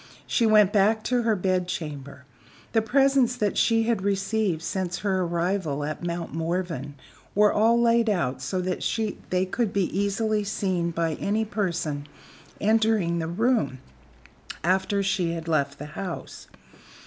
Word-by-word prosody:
She 230 - +2
went 210 -2 +5
back 215 +2 +3
to 250 -1 +1
her 225 -2 +2
bed 185 -1 0
chamber. 145 -7 -6 0.5
The 225 - +3
presents 270 +1 +3
that 210 -5 -1
she 225 -1 +3
had 225 -3 0
received, 195 -3 0
since 180 -1 -2
her 190 -2 0
arrival 170 -3 -1
at 155 +3 -4
Mount 170 -1 -4
Morven, 165 -4 -3 0.4
were 210 +1 +5
all 230 +3 +4
laid 235 -1 +3
out 140 -11 -1
so 185 +8 -2
that 185 0 -2 0.5
they 185 0 +1
could 200 +3 -1
be 195 -4 -1
easily 210 +2 0
seen 185 -4 -1
by 165 -1 -1
any 215 +2 0
person 170 -9 -2 0.5
entering 215 -5 +2
the 160 - -2
room, 175 - +1 0.9
after 190 +3 +1
she 185 -3 0
had 165 0 -6
left 155 -4 0
the 150 - -7
house. 185 -4 -6
190 Hz, 150 wpm, -25 LUFS, 170-215 Hz, 0.9 s, went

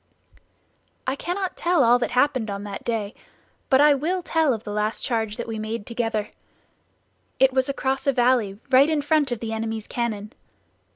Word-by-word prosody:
"I 260 - 0
cannot 365 +5 -3
tell 345 -5 +2
all 240 +1 +5
that 240 - -1
happened 255 -3 +1
on 200 0 -4
that 205 -1 -7
day, 220 -3 -2 0.6
but 265 - +5
I 295 0 +7
will 345 +6 -1
tell 320 -4 +2
of 225 -3 -3
the 210 - -6
last 210 +1 -1
charge 220 -3 -1
that - - -4
we 225 -1 -4
made 215 0 -4
together; 225 -3 -2 1.1
it 265 0 +4
was 260 +1 +1
across 270 0 -2
a - - +6
valley 245 -6 +2
right 270 +3 +6
in 305 -2 0
front 295 -2 +2
of 240 - -3
the 225 -1 -3
enemy's 220 -1 -3
cannon. 215 -3 -3
245 Hz, 180 wpm, -24 LUFS, 220-275 Hz, 1.1 s, I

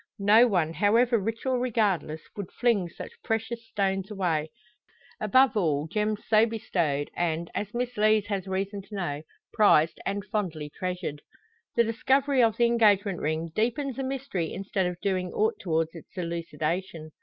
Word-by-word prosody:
No 215 +4 +6
one, 170 -7 +1
however 230 +5 +3
rich 225 +4 -4
or 260 -1 +1
regardless, 205 -10 0
would 200 -4 -6
fling 220 -8 +2
such - - -9
precious 225 +1 -2
stones 195 -2 -1
away; 170 -7 -1 0.7
above 255 +5 +4
all, 155 -7 +1
gems 210 +4 -1
so 220 +1 +5
bestowed, 170 -10 -1
and, 170 -1 -1
as 210 +2 -4
Miss 245 0 -2
Lees 215 0 +3
has 200 -2 -3
reason 195 +1 -2
to 205 +2 -11
know, 150 -7 -3 0.3
prized 165 -7 +4
and 200 0 -3
fondly 175 -8 -3
treasured. 180 -5 -4 0.5
The 235 - +5
discovery 265 +4 +2
of 225 -2 +3
the 240 - +4
engagement 205 -5 +3
ring 160 +2 -2
deepens 245 - -1
the 270 - -2
mystery 260 - -3
instead 195 -1 -1
of 180 -1 -5
doing 185 -2 -1
aught 440 +1 +1
towards 165 -3 -1
its 165 +2 -13
elucidation. 170 -1 -3
200 Hz, 155 wpm, -27 LUFS, 170-225 Hz, 0.7 s, No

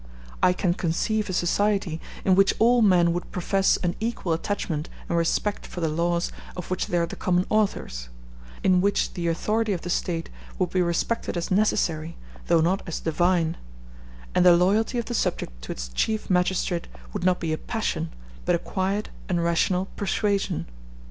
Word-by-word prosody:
I 180 - +6
can 180 -1 +1
conceive 205 +5 -1
a - - -2
society 185 -2 +1 0.2
in 190 - +5
which 195 +1 +4
all 240 +2 +5
men 175 -5 +5
would 175 0 -4
profess 190 +2 +2
an 175 -1 0
equal 220 -6 -1
attachment 165 -3 -2 0.2
and 170 - -1
respect 170 +5 0
for - - -7
the 165 -2 0
laws 170 +2 0 0.3
of 180 - -6
which 185 - -1
they 175 - 0
are 170 - +2
the - - -7
common 180 0 +1
authors; 125 - 0 0.5
in 185 -1 +4
which 200 +1 +1
the 170 -1 -2
authority 215 +6 +1
of 175 - -3
the 175 - -4
State 165 -2 -1 0.3
would 180 -2 0
be 185 - +2
respected 175 +4 -1
as 170 - -3
necessary, 170 -5 +1 0.3
though 170 -1 +4
not 185 +5 +2
as 170 - -3
divine; 170 0 +1 0.8
and 180 - +4
the 175 -1 +7
loyalty 210 +7 +2
of 235 - -1
the 240 - -4
subject - - -2
to - - -6
its - - -5
chief 215 - -1
magistrate 180 -1 +1 0.3
would 205 - -3
not 180 0 +3
be 160 -2 -1
a - - -1
passion, 170 -8 -2 0.3
but 175 - +2
a - - +2
quiet 195 +4 -2 0.2
and 175 -2 +1
rational 180 +2 +2
persuasion. 200 - 0
180 Hz, 180 wpm, -25 LUFS, 170-200 Hz, 0.8 s, the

